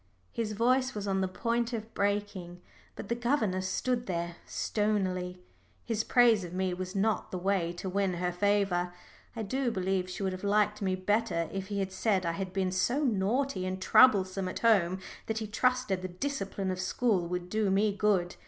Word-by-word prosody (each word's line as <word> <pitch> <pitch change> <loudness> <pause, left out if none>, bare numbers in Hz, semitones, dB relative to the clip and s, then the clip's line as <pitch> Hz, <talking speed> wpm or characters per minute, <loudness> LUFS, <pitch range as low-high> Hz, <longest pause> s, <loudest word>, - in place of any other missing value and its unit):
His 220 -2 -2
voice 255 +4 +2
was 205 -1 -4
on 195 -1 +1
the 190 - +1
point 235 +5 -1
of 225 0 -5
breaking, 200 -3 -2 0.4
but - - -7
the 235 - 0
governess 230 -7 0
stood 245 +4 -1
there 170 -1 -3
stonily. 185 -4 -1 0.4
His 225 -2 0
praise 235 -5 +4
of 175 0 -7
me 185 -1 0
was 185 +1 -5
not 215 +2 0
the 185 - -4
way 180 -2 0
to 175 +2 -6
win 190 -1 0
her 180 +1 -1
favour. 180 -2 +1 0.4
I 225 - -3
do 260 +5 -1
believe 190 -3 -1
she 185 +2 -5
would 190 -1 0
have 185 - -7
liked 210 +1 +2
me 190 -2 +1
better 185 -3 0
if 195 -1 -4
he 205 0 -3
had 195 -1 -1
said 190 -1 +1
I 170 - +1
had 185 +2 -4
been 190 -1 0
so 240 +10 +1
naughty 230 -1 0
and 185 0 -3
troublesome 190 -4 +4
at - - -6
home 190 -6 +4 0.3
that 220 - -2
he 220 - -2
trusted 250 -2 +1
the 185 - -3
discipline 195 -2 -3
of 185 - -4
school 185 -1 +1
would 180 0 -3
do 215 +1 0
me 200 +1 +2
good. 195 -4 +1
195 Hz, 190 wpm, -30 LUFS, 185-220 Hz, 0.4 s, praise